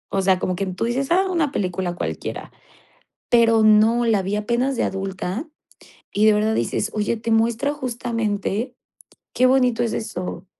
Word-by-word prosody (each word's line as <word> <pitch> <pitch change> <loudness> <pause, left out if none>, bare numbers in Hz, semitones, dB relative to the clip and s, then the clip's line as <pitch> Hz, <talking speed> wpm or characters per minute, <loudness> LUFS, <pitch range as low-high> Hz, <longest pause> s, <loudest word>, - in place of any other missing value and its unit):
O 195 - +2
sea, 190 -1 +3
como 185 0 -2
que 195 +2 -3
tú 185 +4 -3
dices: 260 +5 -2
"Ah, 375 +3 +4
una 320 -5 0
película 180 -4 -2
cualquiera", - - -5 0.8
pero 230 -2 +4
no, 215 +2 +5
la 220 -4 +2
vi 195 +2 -2
apenas 235 +6 0
de - - 0
adulta. 195 - -3 0.6
Y 210 +1 +3
de 215 - +7
verdad 215 +1 +1
dices: 220 0 -1
"Oye, 210 +2 0
te 230 +1 -2
muestra 230 +5 +1
justamente 235 -3 -3 0.6
qué 255 - +4
bonito 250 -2 +3
es 230 - -1
eso". 185 -4 -5
220 Hz, 165 wpm, -22 LUFS, 195-240 Hz, 0.8 s, de